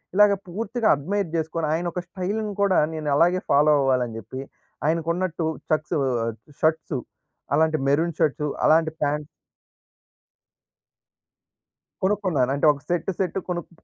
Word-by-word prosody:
ఇలాగ 210 Hz, 0 st, +6 dB
పూర్తిగా 220 Hz, +5 st, -2 dB
అడ్‌మైర్ 190 Hz, +6 st, -2 dB
చేసుకొని, 160 Hz, 0 st, -1 dB
ఆయన 170 Hz, +2 st, -1 dB
ఒక 180 Hz, -, -2 dB
స్టైల్‌ని 205 Hz, +4 st, -3 dB
కూడా 195 Hz, -2 st, +4 dB
నేను 155 Hz, -2 st, -2 dB
అలాగే 175 Hz, +3 st, +3 dB
ఫాలో 150 Hz, +2 st, +5 dB
అవ్వాలని 125 Hz, -4 st, +1 dB
జెప్పి 130 Hz, +6 st, -7 dB, 0.5 s
ఆయనకున్నట్టు 170 Hz, +1 st, 0 dB, 0.2 s
ఛాక్షు 155 Hz, -1 st, 0 dB, 0.3 s
ఆహ్, 115 Hz, -1 st, -2 dB, 0.3 s
షర్ట్సూ 160 Hz, -3 st, +1 dB, 0.5 s
అలాంటి 160 Hz, +1 st, +3 dB
మెరూన్ 165 Hz, +4 st, +2 dB
షర్ట్స్, 150 Hz, 0 st, +1 dB, 0.2 s
అలాంటి 160 Hz, 0 st, +4 dB
ప్యాంట్ 150 Hz, 0 st, 0 dB, 2.8 s
కొనుక్కున్నాను. 185 Hz, -10 st, +1 dB
అంటే 145 Hz, -, 0 dB
ఒక 140 Hz, -, -12 dB
సెట్టు 175 Hz, +2 st, 0 dB
సెట్ 190 Hz, 0 st, -1 dB
కొనుక్ 175 Hz, -2 st, -3 dB
160 Hz, 120 wpm, -24 LUFS, 150-185 Hz, 2.8 s, ఇలాగ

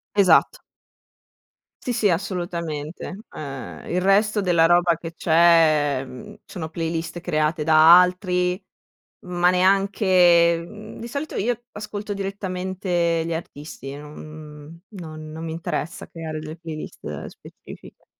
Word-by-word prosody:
Esatto. 200 Hz, -, +4 dB, 1.2 s
Sì, 250 Hz, -, -3 dB
sì, 225 Hz, -4 st, +2 dB
assolutamente. 170 Hz, -2 st, -3 dB, 0.2 s
Ehm, 135 Hz, -3 st, -7 dB
il 180 Hz, -, 0 dB
resto 205 Hz, +3 st, +3 dB
della 175 Hz, -4 st, +3 dB
roba 175 Hz, -1 st, +4 dB
che 165 Hz, +1 st, -8 dB
c'è, 160 Hz, -5 st, +4 dB
mhmm, 125 Hz, -1 st, -11 dB
sono 160 Hz, -4 st, -6 dB
playlist 165 Hz, +1 st, -4 dB
create 155 Hz, -2 st, 0 dB
da 160 Hz, +2 st, +8 dB
altri, 180 Hz, 0 st, +1 dB, 0.7 s
ma 175 Hz, 0 st, +2 dB
neanche 185 Hz, -2 st, +4 dB
mhmm 215 Hz, +2 st, -11 dB, 0.2 s
di 235 Hz, -, -6 dB
solito 285 Hz, +5 st, -5 dB
io 240 Hz, +2 st, -1 dB
ascolto 210 Hz, 0 st, -6 dB
direttamente 185 Hz, -3 st, -2 dB
gli 170 Hz, -, -3 dB
artisti, 145 Hz, -4 st, -8 dB
non, 150 Hz, 0 st, -10 dB
mhmm 155 Hz, +1 st, -11 dB, 0.2 s
non 155 Hz, -2 st, -9 dB
non 160 Hz, +1 st, -7 dB
mi 160 Hz, -, -4 dB
interessa 165 Hz, 0 st, -4 dB
creare 160 Hz, -2 st, -6 dB
delle 155 Hz, +1 st, -7 dB
playlist 160 Hz, -2 st, -7 dB
specifiche. -, -, -14 dB
170 Hz, 120 wpm, -23 LUFS, 160-190 Hz, 1.2 s, da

